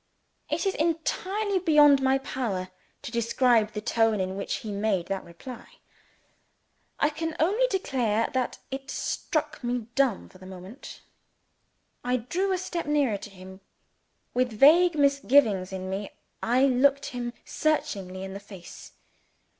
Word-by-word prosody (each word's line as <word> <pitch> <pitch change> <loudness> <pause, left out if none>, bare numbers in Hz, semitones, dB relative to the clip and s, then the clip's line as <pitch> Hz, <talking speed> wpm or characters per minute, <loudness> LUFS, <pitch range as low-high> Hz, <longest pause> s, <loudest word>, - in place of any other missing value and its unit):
It - - -1
is 390 - +1
entirely 375 +5 -1
beyond 295 -5 +6
my 265 0 +3
power 235 -9 -3 0.3
to - - -6
describe 235 -2 +2
the 210 - -4
tone 225 -1 +2
in 185 0 -2
which 200 - -3
he 215 - -4
made 200 -3 0
that 195 -1 -2
reply. 230 +9 -11 1.3
I 295 - +3
can 325 +1 -4
only 415 +10 +3
declare 245 - 0
that 255 -2 -1
it 270 0 -6
struck 310 -3 -2
me 240 -2 -2
dumb 255 -5 +1
for 185 - -18
the 185 - -12
moment. 190 +7 -10 1.0
I 250 +1 +1
drew 355 - -1
a 375 - +1
step 350 -3 -4
nearer 285 -8 +2
to 210 - -9
him. 190 0 -13 0.7
With 250 -1 +1
vague 320 +9 +6
misgivings 275 -9 +3
in 185 0 -5
me, 195 +2 -4 0.3
I 250 +4 +3
looked 275 +2 +3
him 240 -1 -4
searchingly 200 -12 -1
in 190 0 -6
the 200 - -6
face. 195 -4 -12
250 Hz, 145 wpm, -27 LUFS, 205-295 Hz, 1.3 s, beyond